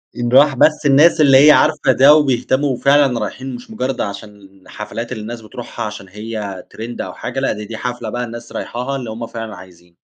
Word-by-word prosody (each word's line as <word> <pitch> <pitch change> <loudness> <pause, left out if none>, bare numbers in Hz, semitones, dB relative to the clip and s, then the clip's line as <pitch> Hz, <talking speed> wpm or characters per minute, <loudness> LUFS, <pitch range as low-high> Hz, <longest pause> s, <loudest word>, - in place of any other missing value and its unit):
إن 120 0 -2
راح 140 +2 +5
بس 150 +3 +2
الناس 150 +4 +5
اللي 140 0 +6
هي - - +10
عارفة 150 -3 +3
ده، 140 +3 +6
وبيهتموا 135 -1 +1
فعلًا 140 -2 +3
رايحين 125 +5 -5
مش 120 -1 -12
مجرد 125 +3 -3
عشان 100 -1 -9
حفلات 115 +3 -7
اللي 115 -4 -5
الناس 115 +2 -7
بتروحها 115 +1 -7
عشان 105 -2 -8
هي 105 -2 -6
ترند 115 +2 -7
أو - - -6
حاجة، 125 +2 -5
لأ 135 - 0
دي، 105 0 -7
دي 110 +1 -7
حفلة 120 -2 -5
بقى 120 +3 -3
الناس 120 0 -8
رايحاها 125 +3 -4
اللي 125 -4 -5
هُم 115 +1 -6
فعلًا 115 -2 -7
عايزين. 90 -2 -16
120 Hz, 200 wpm, -17 LUFS, 105-135 Hz, -, هي